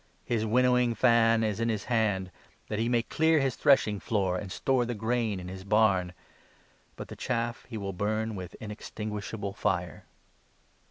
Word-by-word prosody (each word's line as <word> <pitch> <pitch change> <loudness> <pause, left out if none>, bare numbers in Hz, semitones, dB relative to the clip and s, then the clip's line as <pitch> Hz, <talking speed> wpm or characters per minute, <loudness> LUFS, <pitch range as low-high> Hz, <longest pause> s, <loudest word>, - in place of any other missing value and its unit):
His 110 -2 0
winnowing 125 0 +3
fan 115 -2 +4
is 110 -1 -1
in 115 0 0
his. 110 -3 -1
hand, 105 -6 0 0.4
that 105 - -2
he 115 +1 +1
may 120 -1 +2
clear 160 +5 +2
his 135 -2 +1
17 - - -16
threshing 120 -8 +4
floor, 95 -5 0
and 95 +1 -5
store 130 +4 +1
the 120 0 -3
grain 110 -2 -1
in 90 - -8
his 95 +1 -7
barn, 100 -3 +2 0.8
but - - -8
the - - -9
chaff 120 -1 -3
he 115 - -5
will 100 -2 -4
burn 110 +4 -1
with 90 -3 -7
inextinguishable 105 -1 -5
fire." 95 -5 -2
110 Hz, 170 wpm, -29 LUFS, 100-120 Hz, 0.8 s, fan